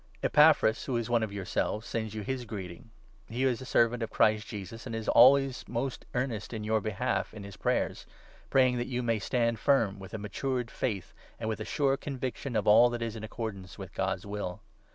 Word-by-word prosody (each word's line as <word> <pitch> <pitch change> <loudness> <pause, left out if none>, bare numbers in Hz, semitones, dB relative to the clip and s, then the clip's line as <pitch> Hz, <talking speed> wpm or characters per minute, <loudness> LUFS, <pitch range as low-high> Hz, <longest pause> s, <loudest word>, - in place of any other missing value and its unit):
Epaphras, 150 -7 +5
who 130 -3 -1
is 115 - -1
12 120 - -6
one 120 - +4
of 110 -2 -2
yourselves, 100 +2 -2
sends 110 -2 -3
you 105 - -4
his 130 +2 -3
greeting. 95 -1 -8 0.4
He 120 +3 -2
is 130 -2 +1
a - - -7
servant 120 -1 +2
of 115 - -2
Christ 110 +1 +2
Jesus, 110 +2 -7
and 115 - -4
is 110 -1 -5
always 135 +2 +6
most 125 +2 -3
earnest 125 -4 -2
in 110 -2 -4
your 110 0 +1
behalf 100 0 -2
in 105 - -8
his 100 0 -9
prayers, - - -1 0.4
praying 130 -2 +4
that 120 - -2
you 125 -1 -2
may 115 -2 +1
stand 115 +1 0
firm, 115 -8 +2
with 95 +2 -8
a - - -2
matured 120 +4 -3
faith 105 -8 -3 0.3
and 110 - -3
with 110 -1 -2
a 110 - -4
sure 140 -2 +1
conviction 130 -2 -4
of 105 - +1
all 115 +4 +7
that 120 -1 -3
is 115 -1 -4
in 110 - -7
accordance 105 -5 -6
with 95 -3 -9
God's 95 +1 -2
will. 100 -3 -5
115 Hz, 215 wpm, -30 LUFS, 105-125 Hz, 0.4 s, all